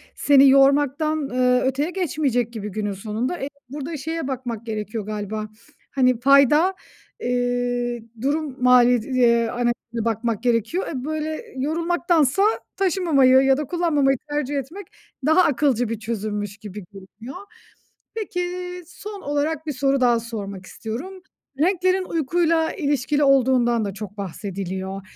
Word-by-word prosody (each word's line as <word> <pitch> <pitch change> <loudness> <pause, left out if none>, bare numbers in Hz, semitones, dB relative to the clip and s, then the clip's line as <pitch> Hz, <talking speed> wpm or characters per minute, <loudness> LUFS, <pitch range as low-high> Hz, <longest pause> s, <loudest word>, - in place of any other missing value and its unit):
seni 280 -1 +6
yormaktan, 280 +2 +3
eee, 250 0 +2
öteye 270 +4 0
geçmeyecek 280 - -1
gibi 210 -2 -5
günün 205 0 -3
sonunda. 220 - -3
E, 275 - -4 0.2
burada 295 +3 -5
şeye 320 +1 -4
bakmak 245 -4 -5
gerekiyor 215 -1 -4
galiba. 215 0 -4 0.4
Hani, 255 -3 +2
fayda, 280 +7 +5 0.5
eee, 245 -1 -1 0.2
durum 280 -1 -2
maliyet 245 -2 +5
eee, 235 -3 +3
analizine 240 -1 -2
bakmak 230 0 -1
gerekiyor. 245 - 0
E, 260 -4 -5
böyle, 310 +5 -3
yorulmaktansa 335 +2 +1 0.3
taşımamayı 325 -9 +4
ya 270 0 +3
da 300 - -2
kullanmamayı 295 -5 +1
tercih 290 -1 -2
etmek, 335 +8 -6 0.4
daha 315 +5 +5
akılcı 255 -6 +1
bir 230 -2 -3
çözümmüş 210 -2 -4
gibi 210 -2 -9
görünüyor. 205 - -11 0.8
Peki, 360 -5 -3 0.4
son 410 +3 -9
olarak 295 +2 -2
1 300 - -1
soru 275 +1 +1
daha 240 -2 +4
sormak 200 -5 -7
istiyorum. 290 - -7 0.4
Renklerin 370 +3 +2
uykuyla 330 0 +1
ilişkili 290 - 0
olduğundan 250 -4 +3
da 200 - -4
çok 205 0 -8
bahsediliyor. 190 0 -5
260 Hz, 125 wpm, -22 LUFS, 230-305 Hz, 0.8 s, seni